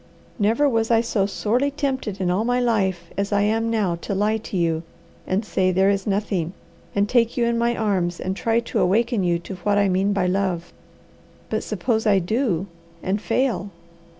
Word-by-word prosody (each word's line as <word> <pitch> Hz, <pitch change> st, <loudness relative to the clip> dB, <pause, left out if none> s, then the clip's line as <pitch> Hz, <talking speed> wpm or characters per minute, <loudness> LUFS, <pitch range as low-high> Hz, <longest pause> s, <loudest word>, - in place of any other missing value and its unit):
"Never 225 Hz, +8 st, +3 dB
was 225 Hz, -4 st, +1 dB
I 230 Hz, -1 st, +4 dB
so 215 Hz, -4 st, 0 dB
sorely 240 Hz, +7 st, 0 dB
tempted 265 Hz, -8 st, -3 dB
in 180 Hz, -2 st, +1 dB
all 190 Hz, +4 st, +1 dB
my 245 Hz, +1 st, +1 dB
life 205 Hz, -7 st, 0 dB
as 200 Hz, +1 st, -1 dB
I 205 Hz, 0 st, +3 dB
am 225 Hz, +2 st, +1 dB
now 210 Hz, -6 st, +1 dB
to 200 Hz, -, -3 dB
lie 210 Hz, +3 st, +1 dB
to 210 Hz, -3 st, -5 dB
you, 165 Hz, -2 st, +1 dB, 0.5 s
and 195 Hz, +4 st, 0 dB
say 185 Hz, -2 st, +1 dB
there 190 Hz, +2 st, +3 dB
is 195 Hz, 0 st, -2 dB
nothing, 195 Hz, -4 st, -1 dB, 0.4 s
and 200 Hz, 0 st, +2 dB
take 235 Hz, +1 st, +2 dB
you 240 Hz, -, +3 dB
in 235 Hz, 0 st, +1 dB
my 235 Hz, 0 st, +1 dB
arms 185 Hz, -6 st, 0 dB
and 185 Hz, +1 st, -2 dB
try 230 Hz, +3 st, +1 dB
to 235 Hz, -, -2 dB
awaken 225 Hz, +3 st, +2 dB
you 175 Hz, -1 st, +2 dB
to 170 Hz, +2 st, -8 dB
what 205 Hz, +2 st, +1 dB
I 200 Hz, -1 st, +3 dB
mean 190 Hz, +2 st, +2 dB
by 195 Hz, -2 st, +1 dB
love. 180 Hz, -2 st, -1 dB, 0.8 s
But -, -, 0 dB
suppose 220 Hz, -3 st, -1 dB
I 200 Hz, -2 st, +5 dB
do 190 Hz, -1 st, 0 dB, 0.4 s
and 200 Hz, +2 st, -1 dB
fail! 250 Hz, -6 st, 0 dB
205 Hz, 195 wpm, -23 LUFS, 190-230 Hz, 0.8 s, I